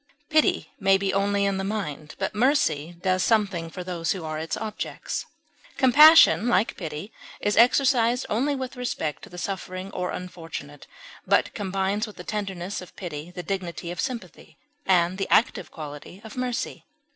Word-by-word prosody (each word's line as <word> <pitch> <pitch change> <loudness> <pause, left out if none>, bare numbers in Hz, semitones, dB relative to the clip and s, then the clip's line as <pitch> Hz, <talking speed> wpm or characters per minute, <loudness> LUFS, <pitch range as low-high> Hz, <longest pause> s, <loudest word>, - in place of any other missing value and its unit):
Pity 310 0 +2
may 195 -1 +4
be 195 0 -1
only 200 +1 +1
in 200 -1 0
the 190 - -2
mind, 185 -8 -4
but 195 - -2
mercy 175 - +1
does 185 -1 +2
something 195 -6 +1
for 180 +2 -7
those 175 -2 -1
who 180 -4 -6
are 155 0 -3
its 160 0 -3
objects. 215 -1 -4 0.5
Compassion, 290 -2 +8
like 220 -3 +2
pity, 160 +4 -6 0.3
is 205 - 0
exercised 245 0 +4
only 270 +7 0
with 260 -1 -5
respect 235 - -3
to - - -11
the 180 - -11
suffering 185 0 -5
or 180 -1 -3
unfortunate, 165 -5 -7 0.4
but - - +3
combines 195 +2 -1
with 215 - -11
the 180 - -9
tenderness 195 -2 -4
of 180 - -13
pity 160 -2 -6
the 180 0 -7
dignity 175 -3 -4
of 175 - -3
sympathy 250 -3 -6 0.3
and 180 0 +3
the 195 - -2
active 230 - +2
quality 150 +3 -9
of 220 - -10
mercy. 250 -2 -3
195 Hz, 165 wpm, -25 LUFS, 175-220 Hz, 0.5 s, Compassion